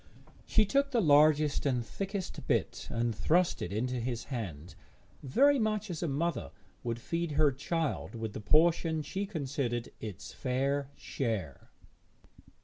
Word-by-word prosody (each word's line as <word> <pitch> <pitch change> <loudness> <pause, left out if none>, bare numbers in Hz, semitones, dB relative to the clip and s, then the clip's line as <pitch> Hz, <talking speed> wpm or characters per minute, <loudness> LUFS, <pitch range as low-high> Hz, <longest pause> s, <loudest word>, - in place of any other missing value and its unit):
She 220 - +4
took 275 +6 +2
the 250 -4 +1
largest 150 -3 +5
and 125 -4 0
thickest 195 - -5
bit - - 0
and 115 0 0
thrust 175 +9 +2
it 85 - -3
into 125 +5 -1
his 120 0 -3
hand, 95 - -6 0.5
very 275 - +4
much 215 -2 0
as 165 - -4
a 170 - 0
mother 160 +4 -1 0.3
would 115 -1 -2
feed 165 +4 -2
her 150 0 +4
child 150 0 -2
with 110 -2 -4
the - - -6
portion 160 - +3
she 195 +6 -3
considered 135 - -2
its 105 -6 -7
fair 135 +2 -1
share. 105 - -4
145 Hz, 140 wpm, -31 LUFS, 120-170 Hz, 0.5 s, largest